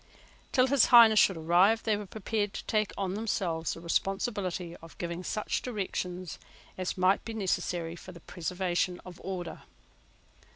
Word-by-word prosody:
Till 255 -2 +4
His 265 -1 +4
Highness 230 -3 +8
should 190 - +4
arrive, 180 +7 +3
they 220 -2 +2
were 205 -1 -6
prepared 210 0 -2
to - - -6
take 215 -1 0
on 190 -2 -2
themselves 185 -6 -2
the - - -9
responsibility 185 -1 -2
of 165 0 -15
giving 170 +1 -4
such 215 +3 -2
directions 185 -6 -4 0.4
as 185 0 -3
might 185 +2 +3
be 225 - -6
necessary 175 -4 -2
for 185 - -11
the 170 - -12
preservation 180 +1 -2
of 180 -2 -11
order. 180 -3 -5
185 Hz, 155 wpm, -29 LUFS, 175-215 Hz, 0.4 s, Highness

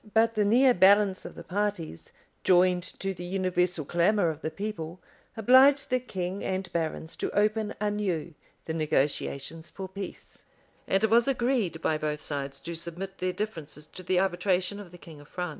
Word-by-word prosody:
But 225 +1 +4
the 215 -2 +2
near 245 +5 +5
balance 195 0 +4
of - - -8
the 170 - -9
parties, 185 - -3 0.3
joined 180 0 +4 0.2
to 195 0 -2
the 175 - -8
universal 180 -3 0
clamor 175 +3 +2
of 155 0 -10
the - - -2
people, 180 -2 -5 0.4
obliged 260 +5 +6
the 255 - +3
king 190 -5 -4
and 190 0 -3
barons 160 -1 -2
to - - -2
open 215 +1 +1
anew 200 -6 -1 0.3
the 160 - -3
negotiations 155 +1 -1
for 190 -1 -7
peace; 195 +1 -9 0.5
and 195 +2 +2
it 220 - +2
was 235 +2 +5
agreed 240 -10 0
by 155 -1 +1
both 150 0 -3
sides 140 -2 -4
to 170 - -6
submit 170 +4 -5
their 185 0 0
differences 165 -7 -5
to 170 - -11
the 185 0 +1
arbitration 190 +1 0
of 200 -3 -9
the 175 - -13
king 160 -4 -13
of 145 - -16
France. 180 +2 -4
185 Hz, 175 wpm, -28 LUFS, 165-210 Hz, 0.5 s, obliged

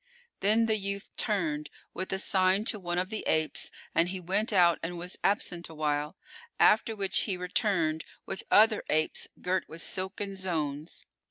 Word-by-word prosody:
Then 215 +3 +3
the 220 -1 +2
youth 200 0 -4
turned 160 -9 -1 0.2
with 185 - -4
a 190 - 0
sign 190 +1 +2
to 215 - +3
one 175 -2 -3
of 185 +3 -1
the 220 - -3
apes, 155 -1 +1 0.2
and 170 +1 +3
he 190 0 -4
went 195 +6 0
out 175 -4 +4
and 175 +1 -4
was 180 +2 -3
absent 180 -4 0
awhile, 150 +1 -2 0.4
after 220 +1 +4
which 195 -2 +2
he 195 -4 -2
returned 180 -4 0 0.2
with 190 - -5
other 215 0 +5
apes 155 +1 +1
girt 185 +1 -1
with 165 +1 -9
silken 195 +1 -3
zones. 160 -5 -3
185 Hz, 165 wpm, -29 LUFS, 165-200 Hz, 0.4 s, other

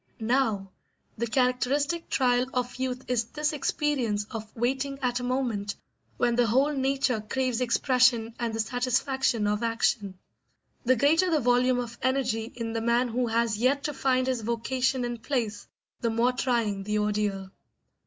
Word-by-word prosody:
Now, 220 -5 0 0.4
the 235 +2 -2
characteristic 265 +7 0
trial 250 -1 +2
of 250 0 -2
youth 255 -1 -3
is 245 -2 +1
this 300 +5 -2
experience 270 -8 0
of 220 -2 -6
waiting 265 +4 -1
at 245 -1 +1
a - - -6
moment 240 -6 -1 0.4
when 240 -1 +2
the 240 -1 +3
whole 270 +7 +3
nature 265 -4 0
craves 255 +2 -1
expression 250 -2 +3
and 235 -2 -1
the 225 - -4
satisfaction 250 0 0
of 210 +1 0
action. 225 -4 0 0.7
The 255 +2 +4
greater 320 +9 +3
the 320 -3 +2
volume 250 0 +3
of 235 -1 -5
energy 250 -3 0
in 230 -2 -4
the 225 - -1
man 235 +2 +2
who 245 +1 0
has 225 -2 0
yet 270 +4 +2
to 295 - -2
find 255 -1 +1
his 255 -3 -1
vocation 245 +3 0
and 240 -1 -5
place, 225 -6 -2 0.3
the 230 - 0
more 230 +2 +2
trying 235 -5 0
the 210 +2 -1
ordeal. 205 -2 -1
245 Hz, 160 wpm, -27 LUFS, 225-260 Hz, 0.7 s, The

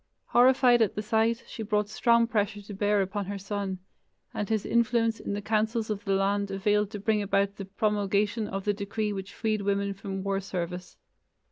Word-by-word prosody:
Horrified 250 -1 +5
at 215 - +2
the 210 - -3
sight, 225 +1 +1
she - - -8
brought 210 -1 0
strong 235 +2 +3
pressure 210 -2 -1
to 205 - -9
bear 205 0 +2
upon 200 +1 -3
her 200 0 -4
son, 195 -1 -3 0.6
and 210 - -3
his 220 -2 0
influence 230 -1 +2
in - - -4
the 205 0 -4
councils 220 +1 0
of 205 -1 -4
the 195 -1 +2
land 200 +1 +1
availed 205 +1 +1
to 210 -1 -6
bring 210 +1 +1
about 200 0 0
the 195 - -5
promulgation 205 +1 0
of 195 -1 -4
the 205 - +2
decree 210 +1 -2
which 195 0 -6
freed 215 -2 -1
women 200 0 0
from 195 -1 -5
war 195 0 0
service. 180 -2 -5
205 Hz, 195 wpm, -28 LUFS, 195-220 Hz, 0.6 s, Horrified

